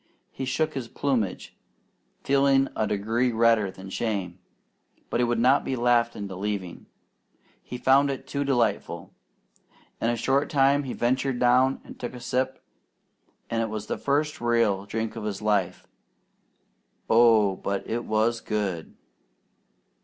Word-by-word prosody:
He 130 - -5
shook 155 +5 0
his 130 -4 -4
plumage, 120 -8 -2 0.7
feeling 135 0 +3
a 110 - 0
degree 115 +5 0
redder 115 -3 +3
from 95 0 -11
shame, 95 -6 -3 0.7
but - - 0
he - - +3
would 120 -1 +1
not 125 +4 +4
be 135 - -2
laughed 120 -1 +2
into 100 -2 -6
leaving. 95 -2 -4 0.7
He 125 - -7
found 135 +3 +4
it 135 -1 -4
too 140 +1 -2
delightful. 120 -7 -1 0.9
In 115 - +1
a 120 - +1
short 135 +5 +1
time 140 0 +3
he 130 - -4
ventured 130 +2 0
down 125 +2 +3
and - - -12
took 125 0 -5
a - - -8
sip, 130 +2 -2 0.8
and 115 0 -1
it 115 - -1
was 105 -1 -5
the - - -3
first 150 +1 0
real 115 -5 +1
drink 110 +2 -3
of 115 - -6
his 105 -2 -3
life. 100 -4 0 1.2
Oh, 110 -4 +5
but 100 0 -3
it 120 +1 -2
was 110 +2 0
good! 100 -6 -3
120 Hz, 145 wpm, -26 LUFS, 105-130 Hz, 1.2 s, Oh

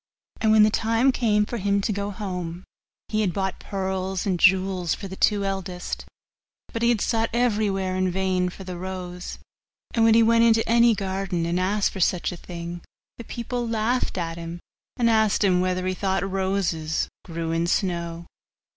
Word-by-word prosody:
And 220 - +3
when 215 -1 +7
the 215 - +4
time 230 +5 +2
came 210 -4 +2
for 240 - -4
him 200 -1 +1
to 210 +2 -1
go 200 +1 -2
home, 180 -4 -5 0.5
he 215 0 +1
had 190 -5 0
bought 190 -1 -2
pearls 190 -1 -3
and 185 -3 0
jewels 185 -2 +3
for 200 - -7
the 190 - -7
two 205 0 +2
eldest, 190 -2 -4 0.7
but 230 - -3
he 235 - +4
had 230 -4 +2
sought 225 -1 +1
everywhere 205 -6 +1
in 185 0 +1
vain 185 0 0
for 190 - -10
the 180 -1 -6
rose; 180 -1 -6 0.6
and 230 - +3
when 225 0 +6
he 230 - +6
went 230 0 +5
into 225 -1 +4
any 235 0 +5
garden 190 -3 -2
and 170 +2 0
asked 195 +2 +1
for 195 - -7
such 180 0 +1
a - - -6
thing, 170 0 -7 0.4
the - - -6
people 240 +1 -4
laughed 230 0 0
at 165 -1 -3
him, 170 +1 -6 0.4
and 240 -2 +2
asked 220 -2 +3
him 180 -2 +3
whether 185 0 0
he 185 - 0
thought 190 +1 -1
roses 190 -5 -1 0.2
grew 165 -1 -4
in 165 +1 0
snow. 170 -3 -1
190 Hz, 185 wpm, -24 LUFS, 180-215 Hz, 0.7 s, when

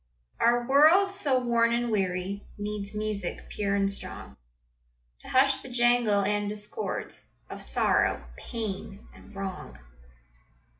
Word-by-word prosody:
Our 240 0 +3
world, 320 +9 +5
so 295 -10 +3
warn 235 -1 +2
and 240 0 0
weary, 190 0 -1
Needs 205 0 -5
music, 210 -4 -3
pure 200 -1 -1
and 200 0 +1
strong, - - -8 0.8
To - - -9
hush 270 +1 +4
the - - -10
jangle 240 -4 +3
and 205 +1 0
discords 210 - -5 0.2
Of - - -7
sorrow, - - +1
pain, 205 -4 -6
and 210 - -16
wrong. 195 -1 -6
215 Hz, 120 wpm, -27 LUFS, 200-245 Hz, 0.8 s, world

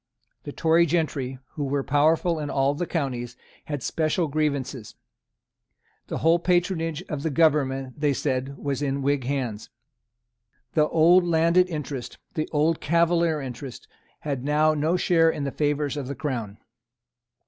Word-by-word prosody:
The 145 - -5
Tory 165 +3 +3
gentry, 145 -5 -1
who 150 - -5
were 140 0 -1
powerful 155 +4 +2
in 150 -1 -4
all 135 +1 +1
the 170 +4 -3
counties, 125 -6 -3 0.3
had 145 -4 -4
special 160 +1 0
grievances. 140 -6 -2 1.1
The - - -3
whole 165 +2 +3
patronage 175 -2 0
of 150 -6 -5
the 160 - -1
government, 135 -3 +1
they 145 -1 +2
said, 135 0 -2
was 140 -1 -3
in 140 -1 -1
Whig 140 -2 0
hands. 125 -6 -3 1.0
The 150 -1 +3
old 170 +3 +5
landed 170 +2 +3
interest, 145 -6 -5 0.2
the 155 - -2
old 155 +2 +1
Cavalier 170 -1 +2
interest, 130 0 -8 0.3
had 140 -4 -3
now 150 +2 +3
no 155 +4 +1
share 165 -2 +3
in 150 - -3
the 140 - -2
favours 145 0 -1
of 140 -3 -4
the 140 - -4
Crown. 115 -7 -4
150 Hz, 150 wpm, -25 LUFS, 135-165 Hz, 1.1 s, old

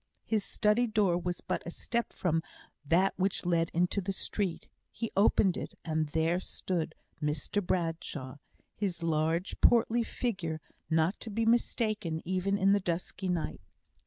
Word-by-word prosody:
His 215 -3 +1
study 215 +5 +2
door 210 -5 +3
was 175 0 -3
but - - -2
a - - -5
step 235 +6 -2
from 165 -3 0 0.4
that 175 +6 +3
which 190 0 +1
led 170 -2 +2
into 180 +4 +1
the 195 +1 -2
street. 195 -2 -1 0.3
He 230 - -4
opened 195 -2 +4
it, - - -6
and 155 -1 0
there 160 +3 +1
stood 180 -2 -2 0.3
Mr 150 +7 -1
Bradshaw; 165 -6 -2 0.4
his 185 -5 -2
large, 165 +2 0
portly 235 0 +5
figure 190 -9 -2 0.3
not 165 +4 +2
to 225 - -6
be 225 +2 0
mistaken 215 -7 +1
even 185 +2 +1
in 195 0 +4
the 205 - +4
dusky 180 +1 -3
night. 165 - -2
180 Hz, 150 wpm, -31 LUFS, 165-205 Hz, 0.4 s, portly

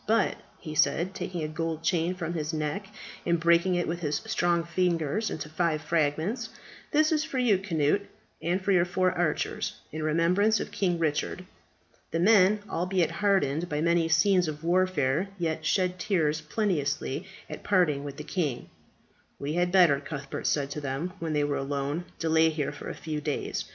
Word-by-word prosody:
But," 220 -2 +2 0.2
he 155 - -7
said, 170 +4 +2
taking 175 -4 -4
a - - -1
gold 160 +1 -3
chain 175 +1 +1
from 170 -2 -4
his 155 -1 -3
neck 155 +6 -2 0.4
and 170 -1 +1
breaking 170 +2 +3
it 175 - 0
with 170 +1 -2
his 150 -3 -1
strong 175 -1 +1
fingers 170 +3 0
into 155 - -5
five 155 0 0
fragments, 165 - 0 0.4
"that 310 +1 +3
is 310 -1 +2
for 310 -4 -5
you, 230 -7 +3
Cnut, 165 0 +1 0.4
and 175 +3 0
for 195 +1 0
your 180 -3 +5
four 185 +1 +1
archers, 170 -3 -1 0.2
in 155 - -5
remembrance 175 +8 +2
of - - -5
King 180 -3 0
Richard." 165 +3 -1 0.6
The 165 - -1
men, 205 +1 +5
albeit 180 -1 0
hardened 175 -5 +1
by 150 - -1
many 170 0 +2
scenes 180 +2 +4
of 150 0 -5
warfare, 175 -2 +1
yet 160 -3 -2
shed 185 -1 +1
tears 160 -5 +1
plenteously 150 -6 -1 0.2
at - - -7
parting 165 -8 +2
with 140 -1 -7
the 150 - -6
king. 150 -8 -2 0.7
"We 145 +2 -3
had 175 +1 +1
better," 175 -7 +5
Cuthbert 140 -1 -5
said 140 -1 0
to 150 - -4
them 140 +6 -3
when 165 -2 -2
they 150 -1 +2
were 145 -1 0
alone, 140 +4 -2
"delay 160 0 +3
here 155 -3 -2
for 145 - -8
a - - -5
few 155 -2 -4
days. 150 -1 -2
170 Hz, 175 wpm, -28 LUFS, 150-185 Hz, 0.7 s, your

